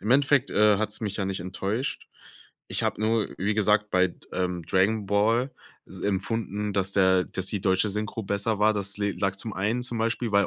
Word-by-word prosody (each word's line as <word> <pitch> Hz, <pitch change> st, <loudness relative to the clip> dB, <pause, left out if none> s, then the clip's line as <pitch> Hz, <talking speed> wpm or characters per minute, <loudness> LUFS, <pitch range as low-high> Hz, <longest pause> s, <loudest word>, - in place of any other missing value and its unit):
im 105 Hz, +4 st, -3 dB
Endeffekt, 140 Hz, 0 st, +4 dB
äh, 105 Hz, -1 st, +4 dB
hat's 110 Hz, -1 st, -2 dB
mich 105 Hz, -3 st, -3 dB
ja 100 Hz, -, -1 dB
nicht 95 Hz, -2 st, -3 dB
enttäuscht. 95 Hz, +8 st, -3 dB, 0.6 s
Ich -, -, -3 dB
habe -, -, -1 dB
nur, 110 Hz, 0 st, +1 dB
wie 100 Hz, +3 st, 0 dB
gesagt, 105 Hz, 0 st, +2 dB
bei 95 Hz, 0 st, +3 dB
d -, -, -17 dB
ähm, 90 Hz, -2 st, -2 dB
Dragon 100 Hz, +4 st, +1 dB
Ball 115 Hz, +6 st, +2 dB, 0.4 s
s -, -, -11 dB
empfunden, 105 Hz, +1 st, -2 dB
dass 95 Hz, 0 st, 0 dB
der 95 Hz, -2 st, +4 dB
dass 95 Hz, 0 st, -5 dB
die 100 Hz, -2 st, -2 dB
deutsche 95 Hz, +2 st, +2 dB
Synchro 105 Hz, +2 st, -3 dB
besser 100 Hz, +2 st, -1 dB
war, 105 Hz, +1 st, +4 dB
das 100 Hz, -1 st, -1 dB
le 100 Hz, -1 st, 0 dB
lag 95 Hz, -1 st, -1 dB
zum 110 Hz, +2 st, -4 dB
einen 110 Hz, +6 st, -1 dB
zum 120 Hz, -2 st, -3 dB
Beispiel 115 Hz, 0 st, -1 dB
weil 100 Hz, 0 st, +4 dB
105 Hz, 205 wpm, -26 LUFS, 95-110 Hz, 0.6 s, Endeffekt